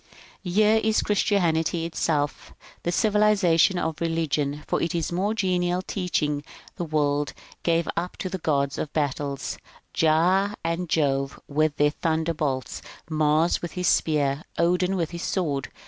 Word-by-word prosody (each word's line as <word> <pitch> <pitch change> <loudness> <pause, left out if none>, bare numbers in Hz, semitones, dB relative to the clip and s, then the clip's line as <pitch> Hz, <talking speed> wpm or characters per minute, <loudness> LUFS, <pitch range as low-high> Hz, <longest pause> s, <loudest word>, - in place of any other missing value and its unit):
« - - -26
Here 210 +4 +3
is 220 0 +2
Christianity 170 -5 +1
itself, 150 -3 -2 0.3
the 175 - -1
civilization 200 -4 +3
of 160 -2 -2
religion: 150 -3 -1
for - - -1
its 170 0 -1
more 195 +5 0
genial 180 -2 0
teaching 150 -7 -1 0.3
the - - -3
world 145 -2 0 0.3
gave 170 -1 +1
up 175 +2 -3
the 185 0 -4
gods 140 -4 0
of 150 - -3
battles, 140 -2 -2 0.2
— - - -28
Jah 180 +6 +3
and 165 +1 -2
Jove 140 -3 0
with 150 +1 +1
their 145 0 +3
thunderbolts. 160 -5 -2 0.3
Mars 155 +2 +2
with 175 - -5
his 180 -1 -1
spear, 145 -3 +2 0.2
Odin 180 +2 +2
with 170 -4 -1
his 170 -1 -6
sword. 145 -10 -1
165 Hz, 140 wpm, -25 LUFS, 150-180 Hz, 0.3 s, Here